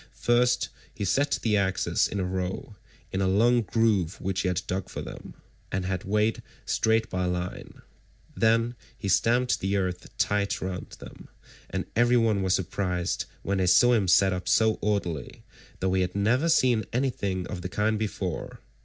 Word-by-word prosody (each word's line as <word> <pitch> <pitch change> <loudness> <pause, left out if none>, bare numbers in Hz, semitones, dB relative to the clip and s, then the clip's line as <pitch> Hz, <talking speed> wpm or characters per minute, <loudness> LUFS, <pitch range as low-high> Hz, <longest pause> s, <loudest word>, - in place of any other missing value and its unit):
First 120 +1 +2 0.3
he 100 - -3
set 140 +9 +1
the 110 -2 +2
axes 95 -2 +1
in 100 - -4
a - - 0
row, 95 +3 -4 0.4
in 95 - -1
a 95 - +2
long 120 +6 +4
groove 105 -4 +1
which 95 +1 -2
he 95 - -1
had 90 0 -1
dug 95 0 -3
for - - -6
them, - - -9 0.4
and 95 0 -2
had 95 0 -3
made 105 +2 +1 0.2
straight 110 0 +1
by 90 0 -2
line.162 90 0 -4 0.5
Then 115 +2 +2 0.2
he - - -5
stamped 120 +6 +2
the 95 +1 0
earth 90 -2 -3
tight 100 -1 0
round 90 -2 -5
them, - - -12 0.4
and - - -3
everyone 115 -3 +3
was 95 -1 +2
surprised 90 -1 -2 0.2
when 100 0 -1
they 90 - +1
saw 120 +7 +6
him 105 -5 +2
set 95 +2 +5
them 90 - -1
up 90 - -5
so 110 -1 +3
orderly, 95 -9 -2 0.4
though 95 0 +1
he 95 - +2
had 90 0 -2
never 120 +11 +2
seen 125 -8 +3
anything 100 -8 -1
of 90 - -6
the 90 - -5
kind 105 +3 0
before. 100 -5 -4
100 Hz, 175 wpm, -27 LUFS, 95-115 Hz, 0.5 s, saw